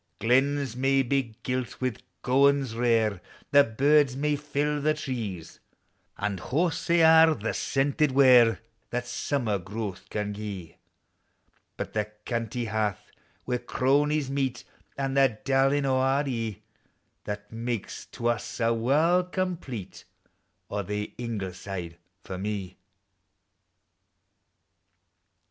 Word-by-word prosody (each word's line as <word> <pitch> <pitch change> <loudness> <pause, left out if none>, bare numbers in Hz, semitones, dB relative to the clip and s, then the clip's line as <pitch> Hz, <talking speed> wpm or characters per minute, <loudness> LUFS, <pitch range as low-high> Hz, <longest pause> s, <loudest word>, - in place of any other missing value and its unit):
Glens 135 +1 +2
may 135 +1 +2
be 130 -3 -1
gilt 125 -2 -3
wF 130 -4 -1 0.3
gowans 135 -1 +3
rare, 115 -5 +2 0.3
The 145 0 +7
birds 140 +3 +3
may 150 +1 +1
fill 145 0 -1
the 155 +1 +2
tree; 115 - -4 0.7
And 100 -3 -2
haughs 165 - -1
hae 170 -1 +4
a' 160 0 +7
the 110 -3 -3
scented 140 +2 +1
ware 125 -4 +6 0.3
That 125 0 -2
simmer 120 -7 -1
growth 100 0 -6
can 105 -1 -3
gie: 100 -5 -7 1.0
But - - -5
the 105 -1 0 0.2
canty 120 0 -2
hearth 110 -3 -2 0.3
where 125 -1 -1
cronies 140 +3 +1
meet, 135 -3 -1 0.3
An' 135 -1 -1
the 135 -5 +3
darling 135 +1 +3
o' 130 -1 +2
our 135 +2 +2
eV, 115 -5 -2 0.7
That 105 0 -6
makes 115 -1 -4
to 120 - -8
us 120 0 -3
a 115 0 +2
warl' 150 +10 +3
complete: 175 - -4 0.7
O, 105 - -1
the 105 +2 -4
Ingle 110 -6 -4
side 90 -3 -7 0.2
for 95 -1 -6
me! 100 -2 -4
125 Hz, 120 wpm, -27 LUFS, 110-140 Hz, 1.0 s, The